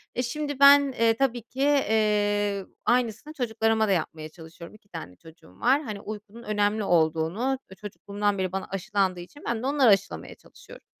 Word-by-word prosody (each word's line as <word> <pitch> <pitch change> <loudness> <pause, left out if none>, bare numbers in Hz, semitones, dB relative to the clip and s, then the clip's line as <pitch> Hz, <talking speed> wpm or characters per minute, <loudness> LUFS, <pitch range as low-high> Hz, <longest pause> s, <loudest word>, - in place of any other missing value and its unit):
E, 250 - 0
şimdi 290 +2 -4
ben, 280 0 +7
eee, 230 -1 +4
tabii 245 0 0
ki, 250 +4 -8
eee, 210 -7 +1 0.2
aynısını 245 +4 0
çocuklarıma 225 -4 0
da - - +1
yapmaya 160 -3 -2
çalışıyorum. 165 +2 -13
2 205 -1 -22
tane 90 +3 -8
çocuğum 160 - -18
var. 265 +5 +3
Hani, 215 -8 -6
uykunun 215 +2 -9
önemli 210 0 0
olduğunu, 175 +9 +1
eee, - - -10
çocukluğumdan 205 +1 -3
beri 185 -1 -2
bana 190 0 -4
aşılandığı 195 -1 -1
için 180 +12 -12
ben 235 0 -2
de 265 - -1
onlara 275 -4 +4
aşılamaya 195 -2 0
çalışıyorum. - - -16
215 Hz, 170 wpm, -26 LUFS, 195-250 Hz, 0.2 s, ben